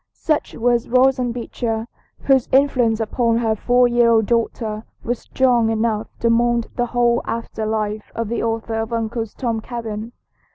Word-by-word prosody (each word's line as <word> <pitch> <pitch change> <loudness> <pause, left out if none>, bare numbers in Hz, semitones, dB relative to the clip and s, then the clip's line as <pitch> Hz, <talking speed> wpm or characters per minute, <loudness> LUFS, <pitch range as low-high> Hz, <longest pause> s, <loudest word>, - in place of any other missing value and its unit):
Such 310 -2 -1
was 240 0 +1
Roxanna 255 0 +3
Beecher, 230 -1 -3 0.3
whose 265 -3 +2
influence 255 -5 +3
upon 230 +1 +1
her 225 -2 +1
four 245 +3 +3
year 240 -1 +3
old 225 -2 +4
daughter 225 -1 -1 0.2
was 240 0 -2
strong 245 -4 +2
enough 220 -1 0
to 230 - +3
mould 235 0 +2
the 245 0 0
whole 240 0 +2
after 230 -1 -4
life 215 -1 -2
of 230 -1 -2
the 235 - -2
author 225 0 -2
of 225 +1 -5
"Uncle 225 0 -2
Tom's 225 +1 -3
Cabin." 225 -2 -6
230 Hz, 160 wpm, -20 LUFS, 225-245 Hz, 0.3 s, old